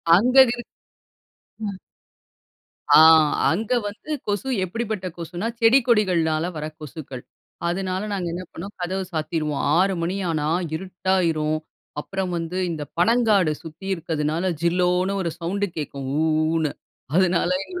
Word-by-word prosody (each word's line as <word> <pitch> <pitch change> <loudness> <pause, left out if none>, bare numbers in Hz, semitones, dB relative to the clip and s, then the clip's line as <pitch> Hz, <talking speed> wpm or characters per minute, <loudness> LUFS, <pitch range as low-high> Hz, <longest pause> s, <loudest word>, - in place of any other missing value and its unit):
அந்தது 250 +4 +6
இரு - - -5 1.0
ம், 195 -1 -6 1.2
ஆ - - +9 0.5
அங்க 210 +7 -2 0.2
வந்து 210 +9 -8 0.2
கொசு 205 +5 -1 0.2
எப்படிப்பட்ட 215 -1 -3
கொசுன்னா, 175 +5 -4
செடி 235 +4 +6
கொடிகள்னால 170 -8 +2
வர 150 - -4
கொசுக்கள். 140 -4 -8 0.4
அதனால 185 +1 -1
நாங்க 185 -3 -2
என்ன 180 +2 -4
பண்ணோம் 195 +5 -8
கதவு 190 +2 -2
சாத்திருவோம். 155 -2 -2 0.2
6:00 195 +1 +3
மணி 175 +3 -1
ஆனா, 150 -2 -1 0.3
இருட்டாயிரும். 170 -4 0 0.4
அப்புறம் 190 +3 -3
வந்து 165 +2 -4
இந்த 155 -3 -4
பனங்காடு 210 -4 +3
சுத்தி 160 +4 -10
இருக்துனால, 165 +1 -1
ஜில்லோன்னு 180 +3 +1
ஒரு 170 -3 -2
சவுண்ட் 190 +4 -1
கேட்கும். 140 -3 -5
ஊஊன்னு 155 -1 +1 0.4
அதனால 180 -1 +3
எங்களுக்கு, 360 -1 -7
180 Hz, 120 wpm, -23 LUFS, 160-195 Hz, 1.2 s, ஆ